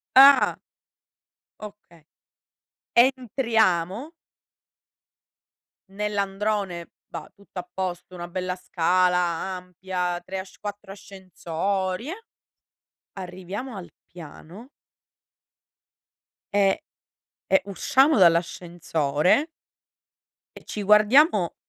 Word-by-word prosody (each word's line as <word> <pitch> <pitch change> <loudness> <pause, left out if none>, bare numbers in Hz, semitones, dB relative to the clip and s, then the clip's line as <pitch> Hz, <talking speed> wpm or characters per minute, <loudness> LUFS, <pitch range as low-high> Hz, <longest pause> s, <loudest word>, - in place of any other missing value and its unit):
Ah. 275 +1 +8 1.0
Okay. 200 -7 -13 0.9
Entriamo. 235 - +2 1.8
Nell'androne 200 -2 -2 0.2
va - - -8
tutto 200 -2 -10
a 180 0 -9
posto. 185 -1 -5
Una 175 0 -6
bella 180 0 -3
scala 180 0 +1
ampia, 180 0 -3
3 190 +1 -5
asc 190 0 -11
4 205 -1 -7
ascensori, 190 - -4
eh. 430 +6 -7 0.9
Arriviamo 190 +6 -7
al 180 - -9 0.2
piano 175 - -12 1.9
e, 200 +9 +2 0.6
e 190 - +3
usciamo 265 +8 +3
dall'ascensore 170 - +2 1.1
e - - -12
ci 210 - -5
guardiamo 210 - +4
190 Hz, 75 wpm, -24 LUFS, 180-210 Hz, 1.9 s, Ah